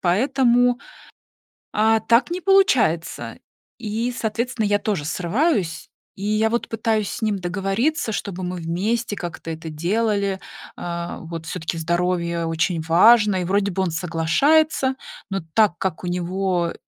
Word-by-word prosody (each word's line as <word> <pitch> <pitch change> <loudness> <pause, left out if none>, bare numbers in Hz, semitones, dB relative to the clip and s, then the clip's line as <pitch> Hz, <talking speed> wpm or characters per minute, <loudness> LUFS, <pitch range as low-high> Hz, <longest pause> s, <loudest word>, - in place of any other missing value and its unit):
поэтому, 245 +5 +3 0.9
а, 220 +1 +3
так 235 +8 +2
не 360 +1 -3
получается. 355 - +2 0.4
И, 230 +1 -2
соответственно, 225 +1 -1
я 205 0 +2
тоже 200 -10 -2
срываюсь. 180 - -1 0.3
И 195 - -9
я 215 +1 +2
вот 235 +1 -1
пытаюсь 220 -2 0
с - - -6
ним 215 -2 0
договориться, 195 - -1
чтобы 195 -3 -4
мы 180 0 -3
вместе 205 +7 -1
как-то 170 -3 -6
это 160 0 -6
делали. 200 +4 0 0.4
А, 170 0 -5
вот, 165 -1 -7
все-таки 165 0 -4
здоровье 170 0 0
очень 165 +1 0
важно. 205 +6 +5
И 180 - -1
вроде 200 +3 +1
бы 190 +1 -1
он 180 - -1
соглашается, 260 - +2 0.3
но 195 -1 -2
так 210 -6 +3
как 185 -3 -3
у - - -3
него 180 0 -1
195 Hz, 140 wpm, -22 LUFS, 170-225 Hz, 0.9 s, важно